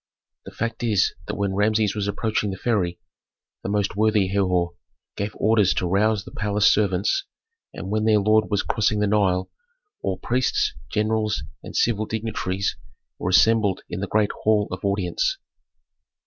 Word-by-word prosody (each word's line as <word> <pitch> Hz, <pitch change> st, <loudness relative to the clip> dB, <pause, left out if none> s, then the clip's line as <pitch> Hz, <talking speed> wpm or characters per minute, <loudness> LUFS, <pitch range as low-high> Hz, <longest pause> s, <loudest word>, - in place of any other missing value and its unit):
The -, -, -9 dB
fact 115 Hz, -1 st, -4 dB
is 110 Hz, -5 st, +2 dB
that -, -, -3 dB
when 100 Hz, -1 st, -1 dB
Rameses 105 Hz, +1 st, +2 dB
was 100 Hz, -1 st, -2 dB
approaching 105 Hz, +1 st, -1 dB
the 95 Hz, -, -5 dB
ferry, 95 Hz, -6 st, 0 dB, 0.6 s
the -, -, -4 dB
most 100 Hz, -1 st, 0 dB
worthy 105 Hz, -2 st, +2 dB
Herhor 90 Hz, -3 st, +1 dB, 0.4 s
gave 100 Hz, +1 st, -4 dB
orders 105 Hz, -3 st, +3 dB
to -, -, 0 dB
rouse 100 Hz, +3 st, +1 dB
the -, -, -10 dB
palace 105 Hz, 0 st, 0 dB
servants, 100 Hz, -, +1 dB, 0.5 s
and 95 Hz, -, -7 dB
when 110 Hz, 0 st, 0 dB
their 110 Hz, -1 st, +5 dB
lord 110 Hz, +1 st, +3 dB
was 105 Hz, -2 st, +1 dB
crossing 105 Hz, -1 st, +1 dB
the 105 Hz, -, +2 dB
Nile 100 Hz, -3 st, +1 dB, 0.5 s
all 95 Hz, -, -2 dB
priests, 125 Hz, +6 st, 0 dB, 0.2 s
generals, 110 Hz, -, 0 dB, 0.2 s
and -, -, -10 dB
civil 110 Hz, -2 st, +1 dB
dignitaries 100 Hz, -3 st, -2 dB, 0.4 s
were -, -, -2 dB
assembled 100 Hz, +1 st, +4 dB
in -, -, -3 dB
the 100 Hz, -, -3 dB
great 105 Hz, 0 st, +1 dB
hall 105 Hz, -1 st, +2 dB
of 95 Hz, 0 st, -6 dB
audience. 100 Hz, -3 st, 0 dB
105 Hz, 160 wpm, -23 LUFS, 95-110 Hz, 0.6 s, their